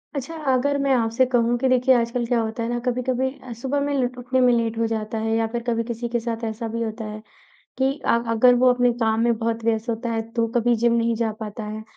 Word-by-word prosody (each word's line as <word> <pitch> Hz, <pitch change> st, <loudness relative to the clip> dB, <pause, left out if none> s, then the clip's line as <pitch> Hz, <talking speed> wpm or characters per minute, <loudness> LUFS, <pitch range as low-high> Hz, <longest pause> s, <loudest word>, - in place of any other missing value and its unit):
अच्छा, 280 Hz, +4 st, -4 dB, 0.2 s
अगर 280 Hz, +3 st, +1 dB
मैं 275 Hz, -1 st, +2 dB
आपसे 230 Hz, +1 st, +2 dB
कहूँ 240 Hz, -1 st, +2 dB
कि 265 Hz, -, +1 dB
देखिए, 255 Hz, 0 st, +4 dB
आजकल 235 Hz, +1 st, 0 dB
क्या 235 Hz, 0 st, +1 dB
होता 225 Hz, +1 st, -3 dB
है 230 Hz, -, -2 dB
ना, 240 Hz, 0 st, -1 dB
कभी-कभी 255 Hz, +1 st, 0 dB
अ, 255 Hz, -, -9 dB
सुबह 265 Hz, +5 st, -2 dB
में 285 Hz, 0 st, -1 dB
लुट 250 Hz, -2 st, -1 dB
उठने 250 Hz, +1 st, -1 dB
में 250 Hz, -1 st, +5 dB
लेट 230 Hz, -1 st, 0 dB
हो 230 Hz, 0 st, +1 dB
जाता 220 Hz, 0 st, -3 dB
है, 225 Hz, 0 st, 0 dB
या 225 Hz, 0 st, +1 dB
फिर 235 Hz, +1 st, -4 dB
कभी 230 Hz, -1 st, +1 dB
किसी 235 Hz, 0 st, -4 dB
के 235 Hz, 0 st, 0 dB
साथ 230 Hz, 0 st, -4 dB
ऐसा 225 Hz, +1 st, -3 dB
भी 230 Hz, +1 st, -4 dB
होता 220 Hz, 0 st, -5 dB
है 215 Hz, 0 st, -7 dB, 0.6 s
कि 265 Hz, 0 st, +2 dB
अ, -, -, 0 dB, 0.2 s
अगर 245 Hz, +2 st, +5 dB
वो 250 Hz, +1 st, +4 dB
अपने 245 Hz, 0 st, +2 dB
काम 220 Hz, 0 st, +2 dB
में 235 Hz, -1 st, +2 dB
बहुत 230 Hz, 0 st, -2 dB
व्यस्त 225 Hz, +1 st, 0 dB
होता 230 Hz, +1 st, -2 dB
है, 225 Hz, -1 st, -1 dB
तो 230 Hz, -1 st, 0 dB
कभी 240 Hz, 0 st, +3 dB
जिम 235 Hz, +1 st, +2 dB
नहीं 230 Hz, 0 st, +1 dB
जा 225 Hz, -1 st, -1 dB
पाता 215 Hz, 0 st, -6 dB
है। 215 Hz, +1 st, -6 dB
235 Hz, 255 wpm, -23 LUFS, 225-250 Hz, 0.6 s, में